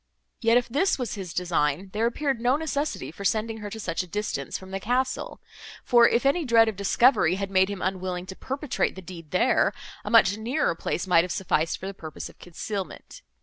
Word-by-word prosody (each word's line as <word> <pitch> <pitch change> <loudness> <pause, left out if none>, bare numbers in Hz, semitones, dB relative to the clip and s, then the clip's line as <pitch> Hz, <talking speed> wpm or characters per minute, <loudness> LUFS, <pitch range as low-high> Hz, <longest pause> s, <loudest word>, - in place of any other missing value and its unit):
Yet, 230 +1 +4
if 245 - +1
this 295 +11 +1
was 250 -4 -3
his 190 -4 -6
design, 175 0 -1
there 220 +2 +1
appeared 270 +1 -1
no 245 +2 +3
necessity 305 -1 -3
for 200 - -9
sending 220 +2 0
her 210 -1 -6
to 220 +2 -7
such 175 -4 -2
a 180 - -8
distance 175 -7 -3
from 190 0 -12
the 195 - -3
castle; 250 +5 -1 0.4
for, 235 -1 +6
if 235 - +1
any 320 +5 +3
dread 230 -4 +5
of 220 - -2
discovery 200 -1 +3
had 195 0 -4
made 190 0 +4
him 200 -2 -5
unwilling 185 -1 -2
to 190 - -8
perpetrate 275 +5 -2
the 190 - -9
deed 170 -3 -10
there, 230 - +2 0.3
a - - -5
much 210 -3 +5
nearer 250 - 0
place 165 - -3
might 170 -3 +5
have 180 - -4
sufficed 165 -2 0
for - - -9
the 195 - -4
purpose 160 -5 -8
of - - -19
concealment. 195 - -6
200 Hz, 210 wpm, -26 LUFS, 185-240 Hz, 0.4 s, for